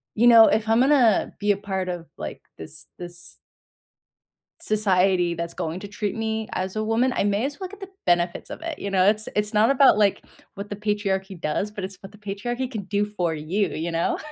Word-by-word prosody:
you 235 +3 +4
know, 230 -2 +9
if 220 0 +1
I'm 225 +1 +4
gonna 255 -5 +4
be 205 +1 +2
a 200 - +1
part 190 -2 -3
of, 175 -2 -5
like, 75 - -6 0.2
this 145 - -8
this 175 0 -8 1.2
society 185 -4 +2
that's 170 0 -4
going 165 +2 -4
to 205 - -8
treat 210 +1 -3
me 220 -1 -2
as 185 +1 -3
a 215 - -1
woman, 230 +4 +1
I - - +1
may 205 +4 +1
as 285 +1 -5
well 375 -2 -5
get 410 - -12
the 390 -2 -8 0.2
benefits 175 0 +1
of - - -8
it, 330 -2 -5
you 200 - -4
know, 190 -1 +3
it's 215 +1 +2
it's 210 +1 0
not 215 +3 +4
about 275 -4 +6
like, 200 -2 +2 0.3
what 200 +1 -6
the 205 - -4
patriarchy 200 -2 -2
does, 160 +7 -1
but 205 -2 -6
it's 190 0 -6
what 195 - -11
the 210 - -16
patriarchy 215 +5 -4
can 220 -6 -5
do 205 +1 0
for 180 -6 -2
you, 175 +6 -1
you 160 +3 -3
know? 165 0 0
205 Hz, 220 wpm, -24 LUFS, 185-220 Hz, 1.2 s, know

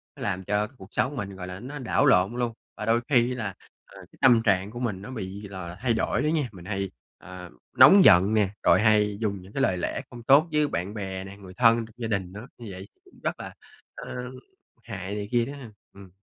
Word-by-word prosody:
nó - - -13
làm 95 -1 -2
cho 105 +2 0
cuộc 95 -2 -14
sống 130 +4 0
mình, 100 -6 -5
gọi 90 -1 -7
là, 90 +1 -7
nó 140 +6 -7
đảo 125 - +1
lộn 95 +6 +4
luôn, 120 -2 -1 0.2
và - - -4
đôi 115 +1 +2
khi 125 -3 +3
là, 105 -6 -4 0.3
ờ, - - -16
cái - - -21
tâm 125 -4 +6
trạng 100 -1 +1
của 120 - -7
mình 105 -7 -3
nó 105 - -8
bị, 100 -3 -6
gọi 95 -3 -7
là, 85 - -8
thay 120 +4 0
đổi 110 - 0
nữa 150 - 0
nha. 155 -4 0
Mình 90 -4 -13
hay, 95 -1 -3 0.3
ờ, 90 -1 -10 0.3
nóng 195 -1 +9
giận 95 +4 +6
nè, 105 -3 +3
rồi - - +5
hay 105 -2 +3
dùng 100 -3 -2
những 95 +3 -15
cái 135 - -1
lời 95 -9 +2
lẽ - - -3
không 120 -1 -11
tốt 140 +7 +5
với 150 -1 +2
bạn 90 -3 -3
bè 95 -3 -5
nè, 95 +1 -10
người 95 -2 -12
thân 115 -1 +5
trong 110 - -17
gia 120 - -4
đình 100 -5 -2
nữa, 110 +5 -9
như 120 - -10
vậy 95 +1 -9 0.2
cũng - - -21
rất - - -2
là, - - -8 0.4
ờ, 125 0 -7 0.5
hại 100 -3 -6
này 105 -1 -4
kia 120 -1 +2
đó 140 - -7
ha. 135 -5 -10 0.2
Ừm. 100 -1 -13
105 Hz, 250 wpm, -26 LUFS, 95-120 Hz, 0.5 s, nóng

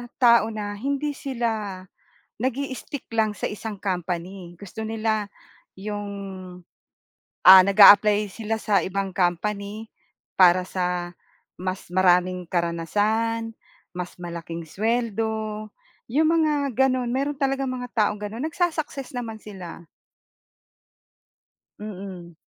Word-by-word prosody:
tao 235 -3 +5
na 210 -2 -4
hindi 280 +4 -1
sila 225 -9 -3 0.5
nag-i-stick 265 +2 -4
lang 220 -1 +2
sa - - -3
isang 210 -1 -6
company 180 -1 -4
gusto 205 +2 -7
nila 220 -2 -1 0.5
'yong 205 0 -4 1.3
ah 190 0 +11
nag-a-apply 205 +1 +7
sila 225 +1 -3
sa 210 -3 +2
ibang 195 +2 -3
company 200 +4 -2 0.5
para 180 0 +6
sa 180 -1 -2 0.5
mas 185 -1 -4
maraming 180 0 +3
karanasan 210 +7 0 0.4
mas 180 -1 -5
malaking 170 -1 -6
suweldo 220 +2 -2 0.4
'yong 305 +7 +2
mga 310 -1 +3 0.2
gano'n 255 -2 +2
meron 275 +4 -1
talagang 270 -1 0
mga 250 -1 -5
taong 210 -1 +2
gano'n 215 +6 -5
nagsu-success 315 -5 -2
naman 230 -3 -4
sila. 185 -5 -9 2.0
Mm. 190 -4 -8
210 Hz, 100 wpm, -24 LUFS, 185-230 Hz, 2.0 s, ah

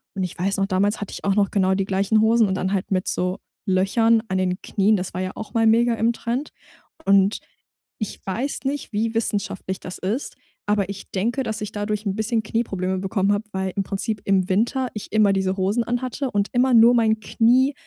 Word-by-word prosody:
Und, 190 - -1
ich 180 - -5
weiß 195 +3 0
noch, 195 0 +1
damals 200 +3 +1
hatte 205 - -5
ich - - -8
auch 195 -1 +2
noch 205 -2 +3
genau 190 -2 +2
die 190 0 0
gleichen 200 +3 +2
Hosen 225 0 +4
und 190 - -1
dann 190 0 -1
halt 195 0 -2
mit 185 -1 0
so 180 +1 -1 0.3
Löchern 220 +5 +3
an 190 -2 -1
den 185 0 -1
Knien. 205 +1 +2
Das 185 0 -5
war 185 - -2
ja 185 0 -3
auch 220 - -8
mal 225 - +3
mega 230 +1 +4
im 230 +1 +1
Trend. 240 +5 -3 0.5
Und, 195 +1 +4 0.6
ich 215 - -4
weiß 235 +9 -2
nicht, 275 -4 -3
wie 225 +2 -1
wissenschaftlich 200 -4 -2
das 180 - -7
ist, 215 +9 -3 0.3
aber 205 -2 +1
ich 200 0 -8
denke, 235 +8 -1
dass 220 -1 -4
ich 210 - -4
dadurch 210 0 -3
'n 195 - 0
bisschen 220 +1 0
Knieprobleme 190 -4 -2
bekommen 195 +1 +1
habe, 205 +2 -2
weil 190 0 -2
im 200 - +1
Prinzip 200 +2 -3
im 190 -2 +2
Winter 240 +6 +1
ich 215 - -7
immer 210 -2 +4
diese 190 0 0
Hosen 200 +5 +1
anhatte 255 +3 -2
und 205 0 0
immer 255 +1 +3
nur 235 +2 +7
mein 220 -2 +3
Knie 245 +5 +3
205 Hz, 215 wpm, -23 LUFS, 190-230 Hz, 0.6 s, nur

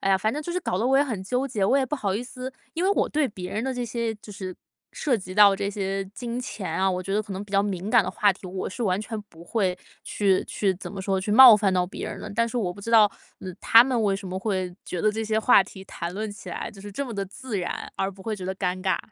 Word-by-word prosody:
哎 195 - +1
呀， 190 - +4
反 220 +2 0
正 300 - -3
就 345 - -4
是 360 - 0
搞 265 - -2
得 225 - 0
我 270 +1 +4
也 285 - +4
很 225 -9 -4
纠 250 +7 -1
结， 215 -6 -1
我 265 +8 +4
也 265 - +1
不 280 - -2
好 205 -9 -1
意 215 - -2
思 255 +1 -7 0.2
因 335 - -2
为 390 - +3
我 - - +2
对 300 -2 +1
别 180 -3 -7
人 215 +2 -1
的 265 - -1
这 245 -1 -3
些 230 -1 -2
就 210 0 -12
是 190 -2 -6 0.4
涉 275 -6 0
及 185 -3 -8
到 205 -1 +7
这 200 0 -2
些 195 -1 -2
金 235 +4 -5
钱 205 -6 -5
啊， 190 0 +2
我 180 - -2
觉 195 +2 -3
得 210 - +2
可 205 -2 -8
能 190 +2 -5
比 205 - -16
较 200 0 +4
敏 195 -1 -3
感 - - +6
的 - - -3
话 205 -1 +3
题， 190 0 -12
我 185 +1 -4
是 195 - -6
完 190 -3 +1
全 220 0 -5
不 165 0 -14
会 190 -2 0 0.3
去 195 -2 +1
去 195 -3 0
怎 185 - -8
么 200 - -5
说， 190 0 0
去 195 - -3
冒 240 0 +10
犯 200 -2 +1
到 180 -1 +2
别 180 - -6
人 - - -6
的。 - - -7
但 230 +1 +2
是 245 - -5
我 185 -7 0
不 200 - -12
知 230 +3 -5
道， 225 -2 +8 0.4
呃， 185 - -6
他 230 +2 +7
们 255 -3 0
为 200 -2 +2
什 195 - -8
么 185 0 -4
会 185 -3 -2
觉 180 - -4
得 215 +2 +2
这 220 +1 -3
些 220 0 +1
话 220 -2 +6
题 190 0 -12
谈 170 -1 -5
论 215 +2 -4
起 205 - -11
来 - - -4
就 200 - -14
是 205 +1 -8
这 280 +8 -3
么 235 - -6
地 200 -1 -2
自 215 +2 -5
然， 175 - -5
而 195 - -1
不 195 0 -16
会 220 +1 -2
觉 190 - -7
得 190 - -2
尴 185 -1 -2
尬。 190 -1 +1
205 Hz, 330 characters per minute, -25 LUFS, 190-230 Hz, 0.4 s, 冒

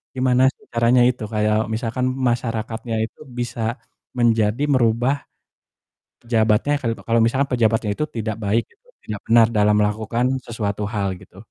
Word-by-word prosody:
gimana 130 0 +2
sih - - -25
caranya 120 +1 +4
itu 125 -3 -4
kayak 105 0 +2 0.2
misalkan 120 +3 -2 0.2
masyarakatnya 115 -1 -3
itu - - -15 0.2
bisa 120 -1 -3 0.6
menjadi 115 +1 +2
merubah 120 +2 +2 1.1
pejabatnya 115 +3 +2
kalu 115 -1 0
kalau 115 0 +3
misalkan 135 +4 +1
pejabatnya 115 -3 +1
itu 150 - -1
tidak 110 -1 -2
baik, 110 +4 +1
gitu - - -32 0.2
tidak 105 -2 -5
benar 115 0 +6
dalam 105 0 +4
melakukan 110 +3 0 0.2
sesuatu 105 -3 -3
hal 100 -2 -1
gitu? 95 - -17
115 Hz, 140 wpm, -21 LUFS, 110-120 Hz, 1.1 s, benar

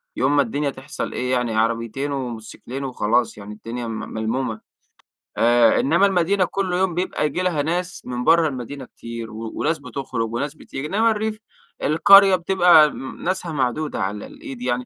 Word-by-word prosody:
يوم 135 +3 +1
ما 145 - +5
الدنيا 140 +4 -1
تحصل 135 0 -6
إيه، 125 0 -2
يعني 125 -3 0
عربيتين 115 +5 -1
وموتوسكلين 125 0 -6
وخلاص، 120 -3 0
يعني 105 +1 -9
الدنيا 115 +2 -6
م 110 -1 -4
ملمومة. 110 0 -3 0.8
آآ 120 0 +5
إنما 170 +8 +3
المدينة 190 0 +2
كل 190 -1 -2
يوم 185 -1 +1
بيبقى 180 -2 -1
ييجي 150 +4 -1
لها 175 -5 0
ناس 175 +4 -2
من 125 0 -4
برّه 165 +3 +5
المدينة 130 0 -6
كتير، 115 -2 -8
و 110 +1 -6
وناس 160 +1 0
بتخرج 125 -4 -4
وناس 145 +5 -3
بتيجي. 145 -2 -7
إنما 225 +5 +2
الريف، 215 0 -2 0.4
القرية 195 +5 +7
بتبقى 175 -4 +5
م 135 - -8
ناسها 185 -1 -2
معدودة 145 +1 -1
على 100 +2 -3
الإيد 130 -3 -10
يعني، 125 0 -1
135 Hz, 165 wpm, -22 LUFS, 120-170 Hz, 0.8 s, القرية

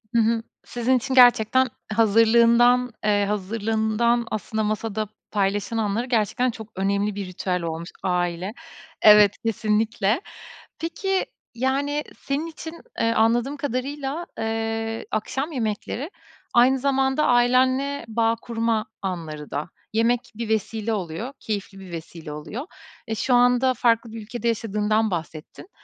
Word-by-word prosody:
hı 235 - +5
hı, 225 0 +1 0.2
sizin 245 +2 +1
için 265 +2 -3
gerçekten 250 0 +6 0.3
hazırlığından, 235 +3 +5
eee, 205 -1 +2
hazırlığından 220 +3 0
aslında 215 +1 -2
masada 215 0 -2 0.2
paylaşılanları 205 +3 0
gerçekten 245 +1 +1
çok 220 -2 -9
önemli 200 +2 0
bir 200 -1 -4
ritüel 180 0 -2
olmuş. 165 +1 -4
Aile, 180 +1 -1 0.5
evet, 210 -1 +7
kesinlikle. 220 - +1 0.6
Peki, 385 +3 -1 0.3
yani, 280 +4 0 0.2
senin 285 +4 -2
için, 320 0 -8 0.3
eee, 230 0 +2
anladığım 240 +6 +2
kadarıyla, 280 +4 -3
eee, 225 0 -2
akşam 265 +8 -2
yemekleri 240 - -3 0.4
aynı 255 +2 +5
zamanda 270 +2 +1
ailenle 255 +3 +3
bağ 225 0 +1
kurma 230 -1 -1 0.2
anları 160 -6 -5
da 150 +3 -3 0.2
yemek 235 +2 +1
bir 230 -1 -4
vesile 220 +1 -1
oluyor 200 - -4
keyifli 200 -2 -4
bir 185 -2 -11
vesile 165 -1 -8
oluyor. 215 - -6 0.4
E, 220 - -2
şu 250 +3 0
anda 245 +1 +4
farklı 230 -1 +1
bir 225 -1 -7
ülkede 235 +2 -4
yaşadığından 215 -1 +1
bahsettin. 165 - -6
225 Hz, 125 wpm, -24 LUFS, 210-250 Hz, 0.6 s, evet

